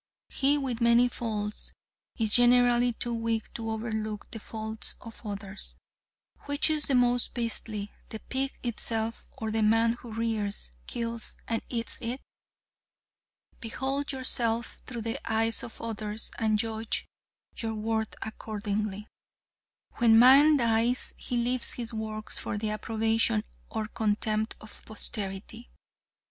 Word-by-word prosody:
He 280 Hz, +2 st, +3 dB
with 255 Hz, -4 st, -2 dB
many 235 Hz, +1 st, +6 dB
faults 215 Hz, -3 st, -3 dB, 0.4 s
is 220 Hz, -2 st, +1 dB
generally 245 Hz, 0 st, +5 dB
too 240 Hz, +1 st, -1 dB
weak 230 Hz, -1 st, -2 dB
to 225 Hz, -1 st, -4 dB
overlook 220 Hz, -1 st, -3 dB
the 225 Hz, -, -6 dB
faults 220 Hz, 0 st, -4 dB
of 230 Hz, -1 st, -11 dB
others. 200 Hz, -2 st, -4 dB, 0.7 s
Which 285 Hz, +2 st, +3 dB
is 305 Hz, -1 st, +2 dB
the 275 Hz, -, +3 dB
most 245 Hz, -1 st, +3 dB
beastly, 225 Hz, -3 st, -1 dB, 0.2 s
the 220 Hz, -, -5 dB
pig 265 Hz, +4 st, -2 dB
itself, 225 Hz, -1 st, -1 dB
or 220 Hz, -1 st, -4 dB
the 220 Hz, 0 st, +1 dB
man 225 Hz, +2 st, +4 dB
who 240 Hz, -1 st, -10 dB
rears, 215 Hz, -, -1 dB, 0.2 s
kills 230 Hz, -1 st, -1 dB
and 225 Hz, -1 st, 0 dB
eats 230 Hz, -2 st, -1 dB
it? 245 Hz, +2 st, -3 dB, 1.4 s
Behold 270 Hz, +5 st, -2 dB
yourself 240 Hz, -3 st, +1 dB
through 235 Hz, -3 st, -4 dB
the 230 Hz, +4 st, -2 dB
eyes 225 Hz, +1 st, +2 dB
of 230 Hz, -, -8 dB
others 215 Hz, -1 st, -1 dB
and 220 Hz, -2 st, +2 dB
judge 220 Hz, 0 st, -1 dB, 0.5 s
your 225 Hz, -1 st, -2 dB
worth 220 Hz, 0 st, -1 dB
accordingly. 210 Hz, -1 st, -3 dB, 0.9 s
When 225 Hz, -2 st, +6 dB
man 275 Hz, +5 st, +8 dB
dies 235 Hz, 0 st, +2 dB
he 245 Hz, -, -3 dB
leaves 245 Hz, +1 st, +2 dB
his 240 Hz, -1 st, -4 dB
works 215 Hz, -1 st, -2 dB
for 205 Hz, -, -2 dB
the 210 Hz, 0 st, -1 dB
approbation 220 Hz, 0 st, +1 dB, 0.3 s
or 220 Hz, -1 st, -3 dB
contempt 215 Hz, 0 st, 0 dB
of 220 Hz, -, -10 dB
posterity. 215 Hz, +1 st, -3 dB
225 Hz, 130 wpm, -29 LUFS, 215-240 Hz, 1.4 s, man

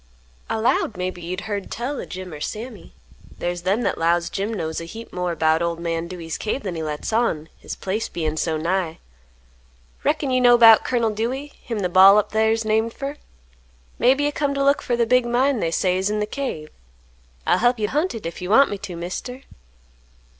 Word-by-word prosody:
"I -, -, 0 dB
'lowed 220 Hz, -2 st, +1 dB
maybe 180 Hz, -1 st, -4 dB
you'd 180 Hz, +3 st, -4 dB
heard 205 Hz, -2 st, -4 dB
tell 260 Hz, +5 st, -3 dB
o' -, -, -7 dB
Jim 185 Hz, -2 st, -8 dB
or 150 Hz, -, -8 dB
Sammy. 230 Hz, +9 st, -7 dB, 0.4 s
There's 175 Hz, 0 st, -3 dB
them 195 Hz, +7 st, 0 dB
that -, -, -1 dB
'lows 170 Hz, +1 st, +1 dB
Jim 200 Hz, +3 st, -2 dB
knows 165 Hz, -6 st, -3 dB
a -, -, -6 dB
heap 225 Hz, +7 st, -10 dB
more 180 Hz, -1 st, -2 dB
'bout 160 Hz, 0 st, +2 dB
old 170 Hz, -1 st, -1 dB
man 165 Hz, 0 st, -2 dB
Dewey's 170 Hz, -3 st, -6 dB
cave 225 Hz, +5 st, -2 dB
than 190 Hz, -, -3 dB
he 165 Hz, -, -4 dB
lets 150 Hz, +6 st, -4 dB
on; 165 Hz, -9 st, 0 dB
his -, -, -7 dB
place 205 Hz, +4 st, -3 dB
bein' 155 Hz, -2 st, -2 dB
so 160 Hz, 0 st, -1 dB
nigh. 170 Hz, 0 st, -1 dB, 1.1 s
Reckon 275 Hz, -, 0 dB
you 255 Hz, 0 st, +2 dB
know 245 Hz, -1 st, +7 dB
'bout 225 Hz, -2 st, +8 dB
Colonel 235 Hz, -3 st, +1 dB
Dewey, 255 Hz, +7 st, -3 dB
him 230 Hz, -4 st, -4 dB
th' 180 Hz, -1 st, -2 dB
Bal' 195 Hz, +2 st, +8 dB
up 210 Hz, -, +1 dB
thar's 220 Hz, +1 st, +2 dB
named 220 Hz, +1 st, +1 dB
fer? 280 Hz, +1 st, -5 dB, 0.8 s
Maybe 270 Hz, +4 st, +4 dB
you 290 Hz, -, +1 dB
come 285 Hz, -1 st, -1 dB
t' 275 Hz, -, -1 dB
look 280 Hz, +1 st, +3 dB
fer 245 Hz, -, -1 dB
the 235 Hz, 0 st, +2 dB
big 250 Hz, +1 st, +3 dB
mine 250 Hz, +2 st, +2 dB
they 165 Hz, -, 0 dB
say's 185 Hz, +3 st, +1 dB
in 210 Hz, 0 st, -1 dB
th' 210 Hz, 0 st, -3 dB
cave? 205 Hz, -, -4 dB, 0.8 s
I'll -, -, +3 dB
hep 245 Hz, +1 st, +3 dB
you 210 Hz, -1 st, 0 dB
hunt 300 Hz, -, 0 dB
hit, 225 Hz, -, -7 dB
if 165 Hz, +1 st, -6 dB
you 180 Hz, -, -4 dB
want 275 Hz, +7 st, +5 dB
me 205 Hz, -, -4 dB
to, 180 Hz, -2 st, -7 dB
Mister." 190 Hz, +10 st, -6 dB
210 Hz, 210 wpm, -22 LUFS, 175-240 Hz, 1.1 s, bout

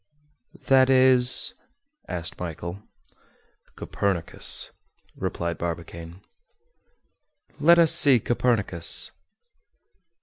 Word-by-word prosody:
"That 130 Hz, -1 st, +3 dB
is—?" 130 Hz, -, +3 dB, 0.5 s
asked 85 Hz, -2 st, -6 dB
Michel. 85 Hz, +2 st, -7 dB, 0.9 s
"Copernicus," 95 Hz, -4 st, 0 dB, 0.4 s
replied 85 Hz, -2 st, -5 dB
Barbicane. 85 Hz, +1 st, -8 dB, 1.4 s
"Let 170 Hz, +4 st, +4 dB
us 165 Hz, -2 st, +4 dB
see 135 Hz, -4 st, +5 dB
Copernicus." 110 Hz, -7 st, 0 dB
100 Hz, 65 wpm, -23 LUFS, 85-130 Hz, 1.4 s, see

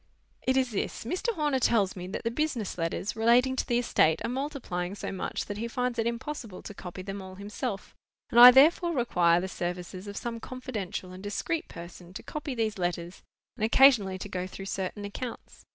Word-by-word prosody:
"It 260 Hz, +1 st, +1 dB
is 260 Hz, -2 st, +2 dB
this. 205 Hz, -, -3 dB
Mr. 365 Hz, -, -1 dB
Horner 295 Hz, -4 st, +1 dB
tells 210 Hz, -6 st, +2 dB
me 180 Hz, -1 st, -6 dB
that 190 Hz, -, -5 dB
the 230 Hz, -, 0 dB
business 245 Hz, -6 st, -2 dB
letters, 170 Hz, +5 st, -2 dB
relating 240 Hz, +4 st, +4 dB
to -, -, -2 dB
the 240 Hz, -, +2 dB
estate, 160 Hz, -9 st, +3 dB
are -, -, -1 dB
multiplying 250 Hz, -9 st, -3 dB
so -, -, -5 dB
much 190 Hz, -, -3 dB
that 205 Hz, -, -5 dB
he 230 Hz, -, -2 dB
finds 250 Hz, 0 st, -2 dB
it 225 Hz, -, +1 dB
impossible 235 Hz, -4 st, -5 dB
to -, -, -8 dB
copy 185 Hz, -1 st, -8 dB
them 195 Hz, +1 st, -5 dB
all 190 Hz, 0 st, -9 dB
himself, 205 Hz, +2 st, -5 dB, 0.4 s
and 235 Hz, -, +5 dB
I 245 Hz, +1 st, +13 dB
therefore 320 Hz, +7 st, +5 dB
require 175 Hz, -9 st, +3 dB
the 185 Hz, -, -3 dB
services 180 Hz, +1 st, -5 dB
of 200 Hz, -, -6 dB
some 235 Hz, -1 st, -4 dB
confidential 220 Hz, -8 st, -5 dB
and 185 Hz, +1 st, -10 dB
discreet 210 Hz, +11 st, -2 dB
person 175 Hz, +1 st, -11 dB
to -, -, -7 dB
copy 295 Hz, -3 st, -5 dB
these 220 Hz, -3 st, -1 dB
letters, 175 Hz, 0 st, -3 dB, 0.3 s
and -, -, -5 dB
occasionally 225 Hz, -5 st, +5 dB
to 185 Hz, -, -6 dB
go 185 Hz, -2 st, -3 dB
through 195 Hz, +1 st, -8 dB
certain 195 Hz, +1 st, -4 dB
accounts. 235 Hz, +4 st, -7 dB
215 Hz, 200 wpm, -28 LUFS, 185-250 Hz, 0.4 s, I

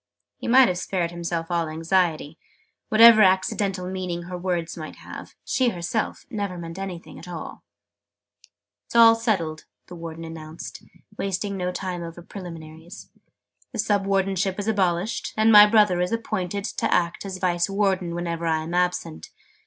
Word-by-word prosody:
He -, -, -6 dB
might 255 Hz, +1 st, +7 dB
have 180 Hz, -1 st, -1 dB
spared 175 Hz, -3 st, -2 dB
himself 170 Hz, 0 st, -4 dB
all 170 Hz, -2 st, 0 dB
anxiety: 165 Hz, -1 st, 0 dB, 0.5 s
whatever 225 Hz, 0 st, +8 dB
accidental 190 Hz, 0 st, +2 dB
meaning 180 Hz, -2 st, -4 dB
her 180 Hz, +1 st, -7 dB
words 175 Hz, -2 st, -2 dB
might 155 Hz, -2 st, -8 dB
have, -, -, -10 dB
she 255 Hz, -2 st, +2 dB
herself 180 Hz, +3 st, -3 dB
never 200 Hz, -5 st, -3 dB
meant 165 Hz, +1 st, -7 dB
anything 185 Hz, -3 st, -7 dB
at -, -, -12 dB
all. 170 Hz, -3 st, -7 dB, 0.8 s
"It -, -, -23 dB, 0.4 s
is -, -, -11 dB
all 230 Hz, -1 st, +8 dB
settled!" 195 Hz, -9 st, -1 dB, 0.2 s
the -, -, -12 dB
Warden 165 Hz, -1 st, -7 dB
announced, 160 Hz, 0 st, -8 dB, 0.4 s
wasting 195 Hz, +1 st, -2 dB
no 180 Hz, -1 st, -2 dB
time 180 Hz, -1 st, -4 dB
over 170 Hz, 0 st, -8 dB
preliminaries. 165 Hz, -1 st, -10 dB, 0.6 s
"The -, -, -5 dB
Sub 200 Hz, -2 st, +1 dB
Wardenship 195 Hz, -1 st, 0 dB
is 205 Hz, 0 st, -4 dB
abolished, 190 Hz, -1 st, 0 dB
and 220 Hz, +1 st, +5 dB
my 210 Hz, -1 st, +10 dB
brother 210 Hz, -5 st, +4 dB
is 180 Hz, -, -1 dB
appointed 205 Hz, -4 st, -2 dB
to -, -, -2 dB
act 170 Hz, -1 st, +1 dB
as 195 Hz, -2 st, -5 dB
Vice 175 Hz, -1 st, 0 dB
Warden 190 Hz, -3 st, 0 dB
whenever 170 Hz, -1 st, -3 dB
I 160 Hz, -1 st, +1 dB
am 165 Hz, +2 st, -6 dB
absent. 180 Hz, -, -1 dB
180 Hz, 160 wpm, -24 LUFS, 170-200 Hz, 0.8 s, my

